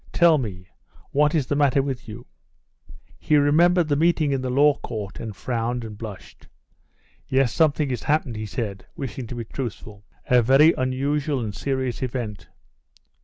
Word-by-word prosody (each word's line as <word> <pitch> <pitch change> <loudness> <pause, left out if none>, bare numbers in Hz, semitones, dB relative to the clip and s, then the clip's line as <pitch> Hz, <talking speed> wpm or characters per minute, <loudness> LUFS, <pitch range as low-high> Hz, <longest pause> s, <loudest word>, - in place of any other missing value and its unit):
"Tell 170 -3 +5
me, 95 -7 -6 0.5
what 150 +2 +2
is 150 -5 +1
the 145 - -1
matter 140 -1 +3
with 135 -4 -5
you?" 115 +3 -9 0.9
He 150 - +2
remembered 165 +4 +4
the 145 - +1
meeting 160 -1 +2
in 135 -1 0
the 130 - -3
law 145 +2 +4
court, 105 -3 -6
and 110 -3 -6
frowned 120 +2 -2
and 110 -1 -8
blushed. 105 -3 -10 0.8
"Yes, 130 -2 +2
something 150 -3 +2
has 125 - -3
happened," 145 -5 0
he 110 0 -5
said, 105 -4 -5
wishing 130 -3 -6
to 125 - -7
be 120 -1 -5
truthful; 110 -4 -7 0.2
"a 125 -1 +4
very 135 +7 +5
unusual 140 +3 -1
and 105 -3 -4
serious 130 0 -2
event." 120 -6 -4
130 Hz, 165 wpm, -23 LUFS, 115-145 Hz, 0.9 s, Tell